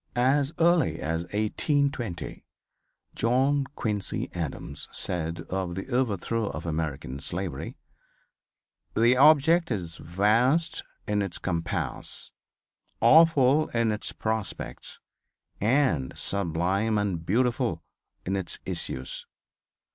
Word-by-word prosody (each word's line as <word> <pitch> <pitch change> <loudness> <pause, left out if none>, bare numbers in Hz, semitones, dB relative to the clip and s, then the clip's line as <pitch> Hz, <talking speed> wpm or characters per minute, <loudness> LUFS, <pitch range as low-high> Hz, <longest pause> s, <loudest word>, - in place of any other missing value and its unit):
As 135 +3 +3
early 170 0 +3
as 80 +2 -2
1820 115 - -1 0.7
John 135 +4 +2
Quincy 105 -3 -2
Adams 80 -4 -5
said 85 -2 -2
of 95 -2 -2
the 95 +7 -5
overthrow 115 -3 0
of 80 -2 -5
American 75 -5 -3
slavery, 85 -2 -4 1.2
"The 120 +3 +5
object 155 +5 +5
is 90 -7 -4
vast 115 - +2 0.3
in 105 0 +1
its 95 -3 -3
compass, 85 -3 -3 0.7
awful 155 -3 +6
in 115 -1 +2
its 105 - -3
prospects 110 -1 -4 0.6
and 105 - +1
sublime 100 +4 0
and 95 -5 -1
beautiful 120 +7 +1 0.4
in 95 - -1
its 95 -3 -2
issues. 65 0 -3
105 Hz, 95 wpm, -27 LUFS, 85-130 Hz, 1.2 s, awful